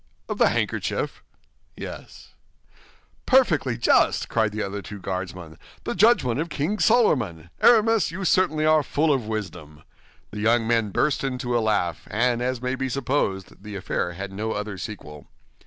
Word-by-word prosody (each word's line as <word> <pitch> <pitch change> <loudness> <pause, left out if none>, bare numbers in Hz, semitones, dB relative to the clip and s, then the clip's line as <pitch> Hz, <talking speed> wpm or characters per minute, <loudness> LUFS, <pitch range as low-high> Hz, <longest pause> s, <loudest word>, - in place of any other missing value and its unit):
"Of - - -4
the - - +5
handkerchief?" - - -2 0.5
"Yes." - - -9 1.0
"Perfectly 155 - +3
just," 120 - +2
cried 110 -2 +1
the 110 +1 -3
other 100 +1 -4
two 100 +1 -9
Guardsmen, 90 -4 -6 0.2
"the - - -3
judgment 180 - +3
of 165 +2 -2
King 165 +8 -2
Solomon! 115 - +2
Aramis, 225 -2 +5
you 185 +3 -5
certainly 155 -5 +2
are 155 0 +5
full 150 +2 +1
of 125 -6 -2
wisdom!" 90 -9 -6 0.5
The 105 - -6
young 115 +2 +2
men 115 -2 +1
burst 140 +9 0
into 125 -2 -2
a 120 - +2
laugh, 100 -7 -1
and 120 +2 +1
as 125 0 -2
may 125 0 -1
be 130 0 -2
supposed, 120 -9 -2
the 105 0 -8
affair 90 -2 -2
had 95 +2 -6
no 110 +3 -3
other 105 -2 -5
sequel. 75 -9 -8
115 Hz, 155 wpm, -24 LUFS, 100-145 Hz, 1.0 s, the